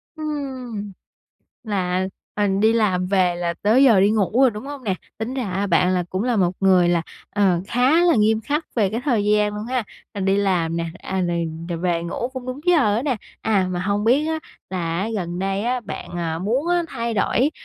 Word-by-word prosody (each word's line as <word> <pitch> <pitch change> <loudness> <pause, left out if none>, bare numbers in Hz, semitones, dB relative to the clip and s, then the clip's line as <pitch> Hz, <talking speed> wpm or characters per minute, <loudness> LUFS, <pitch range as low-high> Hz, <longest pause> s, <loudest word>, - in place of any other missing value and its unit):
Ừm, 260 -9 -5 0.7
là, 185 -3 -1 0.3
ờ, 205 -1 +1
đi 220 +1 +4
làm 190 -5 +1
về 180 -2 +2
là 170 -1 -2
tới 235 +7 +5
giờ 225 -7 +6
đi 200 +2 +4
ngủ 215 +3 +1
rồi, 265 - +6
đúng 210 +2 -8
hông 280 -3 -7
nè? 195 - 0 0.2
Tính 230 +4 -3
ra 260 - -2
á, 195 +3 -1
bạn 180 0 +3
là 180 -1 0
cũng 185 +2 -1
là 245 -3 +1
một 180 -2 +2
người 185 -2 +4
là, 170 -1 +2 0.3
ờ, 190 -4 +2
khá 265 +8 +3
là 345 -2 +5
nghiêm 220 +1 +3
khắc 295 +7 -2
về 205 -5 +2
cái 225 - -2
thời 230 -8 +1
gian 210 0 +2
luôn 210 +1 -5
ha, 250 0 0 0.3
rồi 200 - -3
đi 195 +1 +2
làm 180 -5 +1
nè, 170 0 -1
à, 190 0 -3
rồi 170 -2 0 0.2
rồi 170 -1 -3
về 170 -1 0
ngủ 175 +8 -3
cũng 260 -1 -8
đúng 255 +2 -5
giờ 280 -13 +4
á 235 - -1
nè. 275 -4 0 0.3
À, 200 -4 +2
mà 180 -1 -2
hông 205 +2 0
biết 265 +7 +3
á, 320 0 -1 0.3
là 170 -3 -2
á 210 - -1
gần 175 -3 -3
đây 195 +1 -1
á, 250 +1 0
bạn, - - -7
à, 165 -1 -2
muốn 245 - -1
á 350 0 +2
thay 235 -4 -3
đổi, 250 +7 +2
210 Hz, 225 wpm, -22 LUFS, 185-250 Hz, 0.7 s, giờ